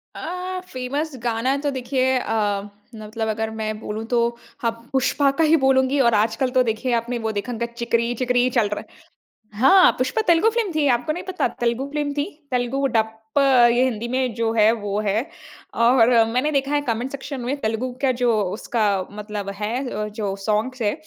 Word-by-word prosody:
अ, 365 +2 -4
famous 275 +4 -4
गाना 240 +3 0
तो 285 +1 -1
देखिए 260 0 0
अ, 210 -4 0 0.3
मतलब 220 +1 -5
अगर 220 0 -2
मैं 215 -1 -4
बोलूँ 215 0 -5
तो 240 0 +1 0.4
हाँ, 230 -1 +1 0.2
पुष्पा 275 +1 +2
का 325 - +3
ही 315 +1 +5
बोलूँगी 265 0 +2
और 235 -3 +4
आजकल 220 +4 +1
तो 255 - +6
देखिए 235 +2 -1
आपने 235 +1 -1
वो 220 -1 -2
देखा 210 +4 -4
होंगा 235 0 -2
"चिकरी 235 0 -1
चिकरी" 250 0 +1
चल 235 -4 +2
रहा 210 - -3
है। - - -22 0.6
हाँ, 370 +7 +7
पुष्पा 255 - 0
तेलुगु 340 +5 +5
फ़िल्म 455 -4 -1
थी, 300 -2 +2
आपको 245 +5 -3
नहीं 350 +4 -4
पता? 370 0 -1
तेलुगु 240 +3 0
फ़िल्म 295 -1 -1
थी, 285 0 -1 0.3
तेलुगु 250 +2 0
डप्प 220 +3 -1 0.3
ये 245 +1 +3
हिंदी 235 -3 -1
में 255 0 -1
जो 230 -1 0
है, 220 -1 +5
वो 205 -3 -2
है। 215 +4 0 0.5
और 235 0 +4 0.2
मैंने 250 +6 0
देखा 275 -1 0
है 290 - +2
कमेंट 240 +3 -1
सेक्शन 275 -1 -6
में 250 +4 -2
तेलुगु 225 +3 -2
का 270 -2 +3
जो 245 -1 +4 0.2
उसका 220 +1 -1 0.3
मतलब 210 -1 -6
है 210 +2 -2 0.2
अ, 210 -2 -3
जो 205 -2 -4
सॉन्ग्स 225 +4 -1
है 205 -2 +1
240 Hz, 190 wpm, -22 LUFS, 220-270 Hz, 0.6 s, हाँ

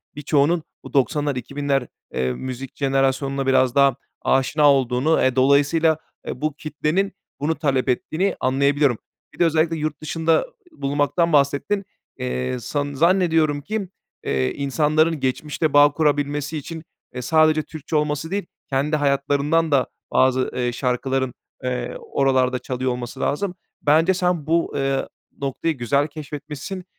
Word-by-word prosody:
birçoğunun 150 +3 +1 0.2
bu - - -11
90'lar 145 0 +1
2000'ler 140 +1 -1 0.3
eee, 65 0 0
müzik 130 - -6
jenerasyonuna 135 0 0
biraz 130 -1 +3
daha 140 -2 +5 0.3
aşina 140 +3 +3
olduğunu, 130 +4 +2
eee, 130 -1 +2
dolayısıyla, 145 +4 +3 0.3
eee, - - -5
bu 155 -1 0
kitlenin 155 +6 -1 0.3
bunu 155 +3 0
talep 140 -4 0
ettiğini 160 +9 0
anlayabiliyorum. 140 -1 +2 0.4
Bir - - -18
de 175 - +5
özellikle 165 0 +2
yurt 155 -1 -3
dışında 160 +1 +1
ı - - -7 0.3
bulunmaktan 145 +4 +1
bahsettin. 145 +8 +2 0.3
Eee, 65 - -2
san 145 +3 -3
zannediyorum 160 -2 +2
ki, 205 +3 -3 0.4
eee, 65 -1 0
insanların 155 +3 +1
geçmişte 150 +3 -1
bağ 145 0 +7
kurabilmesi 145 0 0
için, 160 +2 -7 0.3
eee, 125 - -3
sadece 155 +3 +3
Türkçe 155 0 -6
olması 150 +2 0
değil, 200 -1 -1 0.2
kendi 140 +3 +1
hayatlarından 145 +2 +1
da 135 -2 +3 0.2
bazı, 130 0 +2
eee, 125 -1 0
şarkıların, 130 +1 -1 0.3
eee, 125 -1 -3
oralarda 130 -2 +1
çalıyor 130 0 -2
olması 125 +1 -6
lazım. 180 +7 -1 0.3
Bence 160 +5 +4
sen 180 -4 0
bu, 165 +1 +1
eee, 135 -1 0 0.3
noktayı 140 +4 -1
güzel 140 +4 +1
keşfetmişsin. 150 +4 -7
145 Hz, 135 wpm, -22 LUFS, 135-155 Hz, 0.4 s, bağ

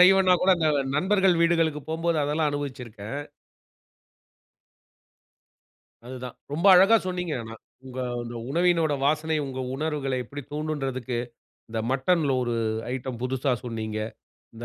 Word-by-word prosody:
செய்யலேன்னா 185 0 +7
கூட, 190 - +4
அந்த 160 -2 +2 0.3
நண்பர்கள் 190 0 +3
வீடுகளுக்கு 165 -3 +2
போம்போது 165 0 0
அதெல்லாம் 150 +1 +1
அனுபவிச்சிருக்கேன். 130 -4 -5 2.9
அதுதான். 125 -1 -7 0.2
ரொம்ப 170 +6 -1
அழகா 195 +5 +7
சொன்னீங்க 180 -3 -2
ஆனா. 115 0 -8 0.3
உங்க 130 0 -7 0.2
அந்த 120 0 -7
உணவினோட 165 -1 +2
வாசனை, 155 +2 +1
உங்க 130 -1 -5 0.2
உணர்வுகள 145 -2 -2
எப்படி 145 +5 -8
தூண்டும்ன்றதுக்கு 135 -5 -3 0.5
இந்த 110 0 -2
மட்டன்ல 140 +2 +2
ஒரு 120 -1 -1 0.4
ஐட்டம் 125 -2 -5
புதுசா 130 +1 0
சொன்னீங்க. 110 -2 -4 0.6
இந்த 120 +1 -8
145 Hz, 115 wpm, -26 LUFS, 125-165 Hz, 2.9 s, செய்யலேன்னா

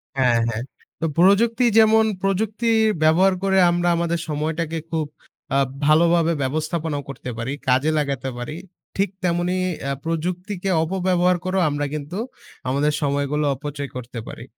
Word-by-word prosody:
হ্যাঁ, 125 -3 +3
হ্যাঁ। 115 +1 -3 0.4
তো 165 - -1
প্রযুক্তি 225 +7 +4
যেমন 220 0 +6 0.2
প্রযুক্তির 220 +4 +1 0.3
ব্যবহার 185 +5 +5
করে 190 0 +2
আমরা 175 0 0
আমাদের 170 0 0
সময়টাকে 160 +2 -2
খুব 160 -2 0 0.5
আ - - +4 0.3
ভালোভাবে 165 +2 +4
ব্যবস্থাপনাও 155 +2 -2
করতে 130 -2 -7
পারি, 120 +5 -3
কাজে 130 +5 +3
লাগাতে 140 -3 -1
পারি, 120 +6 -5 0.4
ঠিক 195 -1 +1
তেমনি 175 +1 0 0.3
আ - - 0
প্রযুক্তিকে 180 +4 -3
অপব্যবহার 180 0 +1
করেও 185 0 +1
আমরা 145 0 -2
কিন্তু 150 +5 -5 0.5
আমাদের 145 +3 +1
সময়গুলো 145 +1 0
অপচয় 145 0 -6
করতে 125 -1 -6
পারি। 120 - -8
165 Hz, 135 wpm, -22 LUFS, 145-185 Hz, 0.5 s, যেমন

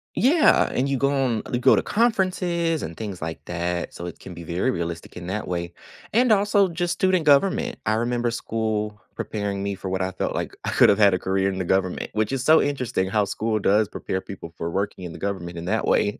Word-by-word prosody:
Yeah! 300 +6 +4
And 130 - 0
you 140 -1 0
go 140 - +2
on 130 -6 0
you 120 - 0
go - - +6
to - - +2
conferences 185 -7 0
and 80 - -6
things 100 -5 -6
like 80 +1 -5
that, 90 0 -3
so 85 - -6
it 90 - -8
can 90 - -10
be 85 - -8
very 85 +9 -1
realistic 85 -3 -4
in 85 - -7
that 105 +2 -3
way. 85 -1 -3 0.4
And 240 0 +4
also 205 -1 +4
just 175 +1 -1
student 185 -2 +1
government. 195 +11 +3
I 110 - +3
remember 120 +1 0
school 110 -2 -2
preparing 100 -2 -3
me 100 - -2
for 95 0 -6
what 95 0 -1
I 95 - -2
felt 95 - -3
like - - -3
I - - 0
could've 105 +1 +5
had 100 -2 +6
a - - -3
career 95 +1 0
in 95 - -4
the 95 - -2
government, 95 0 0
which 110 +1 0
is 135 -2 -2
so 155 +3 +6
interesting 125 -9 -1
how 105 0 +2
school 110 +3 -1
does 105 +2 +3
prepare 95 -2 -4
people 85 -4 -9
for 85 - -4
working 95 +1 -3
in 85 -2 -6
the - - -10
government 90 -4 -4
in 85 - -6
that 110 +4 0
way. 105 - +2
105 Hz, 230 wpm, -24 LUFS, 95-140 Hz, 0.4 s, go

